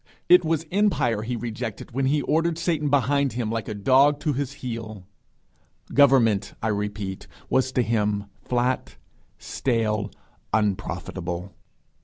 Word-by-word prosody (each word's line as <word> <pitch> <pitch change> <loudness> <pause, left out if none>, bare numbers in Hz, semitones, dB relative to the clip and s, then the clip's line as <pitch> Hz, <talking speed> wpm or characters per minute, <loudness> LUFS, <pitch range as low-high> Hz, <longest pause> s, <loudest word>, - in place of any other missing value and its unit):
It 180 0 +7
was 160 0 0
empire 150 - +2
he 120 +3 -3
rejected 115 -1 -5
when 135 +2 0
he 145 +1 +1
ordered 165 +3 +1
Satan 160 -4 0
behind 140 0 +2
him 120 -3 -2
like 115 -2 -3
a 110 - -4
dog 135 +8 +4
to 150 - 0
his 140 0 -3
heel. 110 -5 -6 0.9
Government, 115 -8 +4
I 110 - -1
repeat, 105 -2 -3 0.2
was 130 0 +2
to 125 - +2
him 105 -2 0 0.2
flat, 125 +1 -1 0.4
stale, 110 -5 -1 0.4
unprofitable. 95 -3 -2
120 Hz, 130 wpm, -24 LUFS, 105-140 Hz, 0.9 s, It